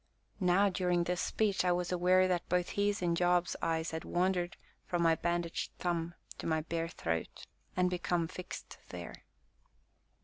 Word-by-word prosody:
Now, 190 +1 +4
during 180 -2 +1
this 180 +1 -1
speech, 205 -4 +1
I 180 - +3
was 175 0 0
aware 185 +1 +4
that 180 -2 -1
both 180 0 +1
his 205 -1 0
and 170 -1 +2
Job's 175 0 +2
eyes 160 0 0
had 160 0 -4
wandered 180 0 0 0.3
from 175 -1 +1
my 165 -1 +5
bandaged 170 0 -1
thumb 170 -1 -1 0.2
to - - -4
my 160 -1 +2
bare 165 +1 -2
throat, 80 - -3 0.3
and 180 0 +4
become 175 -2 0
fixed 180 +1 -8
there. 85 -1 -8
175 Hz, 160 wpm, -33 LUFS, 170-180 Hz, 0.3 s, my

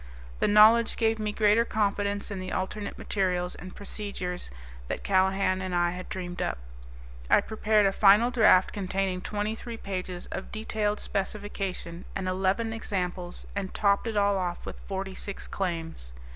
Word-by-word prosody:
The - - +3
knowledge 220 +2 +6
gave 225 -1 +2
me 210 -1 -1
greater 210 +2 +4
confidence 205 -2 -1
in 200 - -4
the 185 0 -5
alternate 200 +2 -3
materials 180 -3 -1
and 185 +1 -10
procedures 200 -3 -5 0.4
that - - -4
Callahan 190 0 +2
and 185 -1 -2
I 175 0 +2
had 180 +1 -7
dreamed 180 -1 -5
up. - - -1 0.7
I - - +7
prepared 215 -1 +2
a 195 - +4
final 210 +5 +5
draft 215 -6 +5
containing 190 -1 -1
twenty 210 +2 -2
three 230 +1 -7
pages 185 -3 -5
of 190 - -5
detailed 215 -1 -1
specification 195 -3 -3
and 190 -1 -2
eleven 195 +5 0
examples 180 -5 -4
and 195 -2 -4
topped 200 +2 +2
it 220 -2 -2
all 200 -1 +3
off 175 -1 -3
with - - -7
forty 195 -1 -3
six 200 +1 -6
claims. 165 - -4
195 Hz, 160 wpm, -28 LUFS, 185-210 Hz, 0.7 s, I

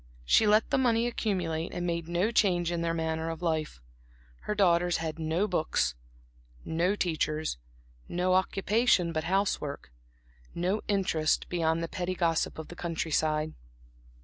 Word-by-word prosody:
She 215 - +5
let 215 +1 +3
the - - +3
money 235 -2 +2
accumulate 180 -9 -2
and 175 0 -2
made 170 -1 -2
no 175 +6 +1
change 175 -6 +2
in 170 -1 -1
their 165 0 0
manner 160 0 -2
of 165 +1 -6
life. 155 - -1 0.7
Her 210 - -1
daughters 175 -3 +3
had 160 0 -4
no 165 +6 0
books, 155 - 0 0.7
no 175 +5 +1
teachers; 155 - -1 0.5
no 180 +1 +1
occupation 195 0 +2
but 155 -1 -2
house 195 +3 +1
work; 140 - -6 0.6
no 185 +5 0
interest 180 -6 +1
beyond 165 -1 0
the - - -2
petty 180 +2 -3
gossip 165 -3 0
of 160 - -7
the 175 - -9
country 165 -2 -3
side. 155 0 +1
170 Hz, 150 wpm, -29 LUFS, 160-190 Hz, 0.7 s, She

